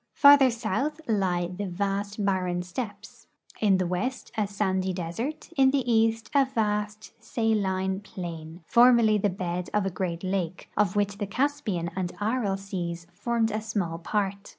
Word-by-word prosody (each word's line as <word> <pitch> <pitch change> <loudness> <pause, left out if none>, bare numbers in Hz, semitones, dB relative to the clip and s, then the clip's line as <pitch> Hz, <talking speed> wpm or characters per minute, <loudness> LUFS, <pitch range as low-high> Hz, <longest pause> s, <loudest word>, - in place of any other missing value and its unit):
Farther 285 -2 +8
south 255 +6 -2
lie 185 -5 +1
the 185 +3 -5
vast 200 +2 -2
barren 180 -2 0
steppes, 205 +2 -7 0.3
in 200 -3 +4
the 185 - 0
west 215 +9 -3
a 215 -3 0
sandy 190 -2 -1
desert, 185 - -4
in 265 -2 +5
the 265 -2 0
east 225 0 +2
a 280 -1 +5
vast 210 -4 -2
saline 190 -4 0
plain, 170 -4 -8
for 245 +6 +6
merly 220 -4 +4
the 205 - +2
bed 180 -1 -3
of 210 -2 +2
a 195 - -1
great 175 -2 -3
lake, 185 -2 -3
of 205 -2 +2
which 205 0 0
the 205 - -2
Caspian 205 -8 -1
and 185 -2 -2
Aral 210 -2 0
seas 175 -4 -5
formed 225 +3 0
a 215 +1 -2
small 195 -7 -2
part. 200 +2 -2
200 Hz, 160 wpm, -27 LUFS, 185-225 Hz, 0.3 s, Farther